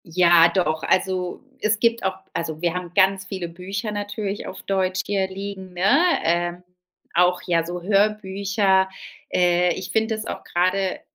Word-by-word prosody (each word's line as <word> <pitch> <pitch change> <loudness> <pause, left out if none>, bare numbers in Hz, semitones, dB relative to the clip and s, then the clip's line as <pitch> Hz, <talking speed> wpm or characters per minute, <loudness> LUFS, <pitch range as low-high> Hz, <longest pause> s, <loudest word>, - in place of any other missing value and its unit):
Ja, 170 0 +5
doch. 160 -4 0
Also, 185 +1 0 0.2
es 215 0 +1
gibt 230 +1 +2
auch 190 -1 -1 0.2
also, 160 -2 -3
wir 170 -1 +1
haben 180 -1 -5
ganz 195 0 +3
viele 190 -2 -5
Bücher 195 +6 -5
natürlich 205 0 -4
auf - - -8
Deutsch 190 -1 0
hier 195 -2 0
liegen, 190 -1 -7
ne, 180 +1 -4 0.4
äh, 175 +1 +1 0.6
auch, 180 +1 +3
ja, 170 -2 +2
so 175 +1 -5
Hörbücher. 195 -1 +2 0.4
Äh, 180 0 +3
ich 180 -1 -6
finde 220 +2 +1
es 215 0 -6
auch - - -6
grade 185 +2 0
190 Hz, 155 wpm, -23 LUFS, 175-200 Hz, 0.6 s, Ja